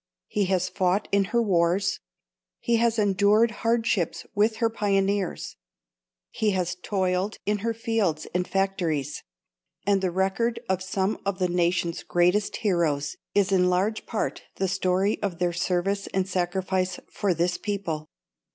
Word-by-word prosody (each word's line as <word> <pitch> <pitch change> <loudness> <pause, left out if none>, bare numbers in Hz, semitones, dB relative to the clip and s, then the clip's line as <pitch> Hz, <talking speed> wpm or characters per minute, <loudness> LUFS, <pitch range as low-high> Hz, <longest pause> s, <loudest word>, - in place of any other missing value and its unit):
He 205 -1 0
has 185 -1 +1
fought 185 +2 0
in 200 -1 +3
her 235 +4 +1
wars; 180 -1 +2 0.6
he 235 -1 +1
has 230 0 +2
endured 205 +2 +4
hardships 225 -6 0
with 215 +1 +2
her 230 0 +2
pioneers; 200 -3 -1 0.7
he 215 - 0
has 180 -1 0
toiled 185 +1 -1
in 210 +1 +1
her 230 +3 -1
fields 215 -9 0
and 180 0 0
factories; 170 -7 -1 0.6
and 200 -1 +3
the 185 - +1
record 195 +6 0
of 190 -1 0
some 190 +2 -1
of 200 -1 -1
the 180 -2 0
nation's 175 -1 0
greatest 180 +4 +2
heroes 160 -8 0 0.2
is 200 -1 +3
in 180 -1 +4
large 195 +5 0
part 220 - -2
the 190 - 0
story 190 +2 +1
of 195 -5 -2
their 175 0 0
service 190 +3 0
and 190 -1 +1
sacrifice 185 0 -1
for 195 -4 0
this 175 +2 0
people. 190 -7 -3
190 Hz, 145 wpm, -26 LUFS, 180-205 Hz, 0.7 s, endured